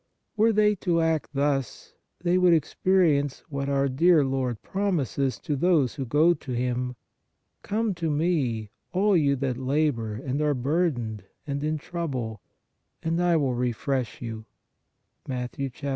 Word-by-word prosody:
Were 225 +1 +4
they 210 -1 +4
to 175 -2 +1
act 160 -2 +1
thus, 140 -2 -1 0.3
they 180 +1 +3
would 180 -2 +6
ex 155 -2 -2
perience 155 -7 +3
what 140 -1 -3
our 140 0 +2
dear 155 +3 +4
Lord 130 -4 -1
promises 145 - -1
to 150 -4 -2
those 150 -4 +2
who 135 -3 -5
go 155 +7 +4
to 145 -4 -8
Him: 125 +1 -1 0.3
" - - -51
Come 215 0 -1
to 170 -2 -2
Me, 145 - 0 0.2
all 200 +2 +3
you 145 -4 +3
that 130 -2 -2
labor 130 -5 0
and 130 +5 -3
are 150 -1 +2
burdened 125 - -1 0.2
(and 140 0 -3
in 155 +1 0
trouble) 130 - -4 0.6
and 165 +2 0
I 175 -2 +3
will 135 -4 +1
refresh 125 -1 -2
you 110 -2 -6 0.4
" - - -41
(Mat. 125 -2 -4
140 Hz, 155 wpm, -26 LUFS, 125-170 Hz, 0.6 s, would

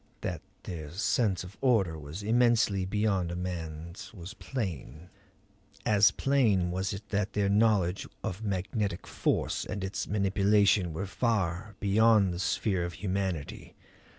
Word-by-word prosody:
That - - -3 0.2
their 80 -4 -6
sense 95 +2 0
of 90 +2 -11
order 110 -11 +3
was 75 +6 -7
immensely 110 -4 +3
beyond 100 -3 0
a - - -3
man's 85 -1 -6
was 90 +3 -8
plain. 90 - -5 0.7
As 105 -1 +6
plain 110 -11 +2
was 95 +1 -1
it 100 +1 -7
that 105 0 -1
their 100 -1 +1
knowledge 100 -4 +2 0.2
of 95 +3 -4
magnetic 100 -1 -2
force - - -1
and 100 -1 -5
its 95 +1 -3
manipulation 100 -2 +3
were 80 +6 -3
far 100 -2 -1
beyond 105 -1 +4
the 85 - -5
sphere 95 0 0
of 85 0 -4
humanity. 95 -3 -3
95 Hz, 135 wpm, -29 LUFS, 90-105 Hz, 0.7 s, As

